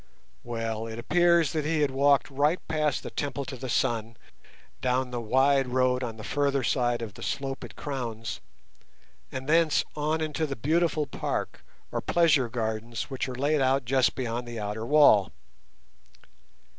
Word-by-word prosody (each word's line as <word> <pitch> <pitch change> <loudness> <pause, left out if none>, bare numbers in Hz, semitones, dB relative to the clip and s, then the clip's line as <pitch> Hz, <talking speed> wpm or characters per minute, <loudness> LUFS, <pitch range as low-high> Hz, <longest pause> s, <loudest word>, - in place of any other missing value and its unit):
Well, 115 -1 -3
it 110 0 -7
appears 170 +4 +3
that 155 -2 -1
he 155 0 +2
walked 140 +1 +2
right 145 +6 +2
past 155 -3 0
the - - -6
Temple 140 -1 -3
to 135 - -6
the 130 0 -6
Sun, 115 -3 0 0.6
down 125 0 0
the 120 -1 -3
wide 135 +3 +3
road 125 0 +1
on 115 -2 -5
the 110 - -8
further 140 +1 0
side 120 -2 +1
of 105 -3 -6
the - - -13
slope 135 0 -3
it - - -10
crowns, 115 -6 -5 0.9
and 130 0 -6
thence 160 0 +3
on 155 +2 0
into 155 0 -1
the 140 - -4
beautiful 155 +4 +1
park, 135 - -4 0.3
or - - -2
pleasure 155 -8 +3
gardens, 110 +1 -3
which 130 0 -2
are 125 - -5
laid 145 +3 +1
out 135 0 +2
just 130 +1 +2
beyond 120 -1 -3
the 120 -1 -6
outer 105 +2 -4
wall. 140 -10 +5
130 Hz, 160 wpm, -27 LUFS, 120-145 Hz, 0.9 s, wall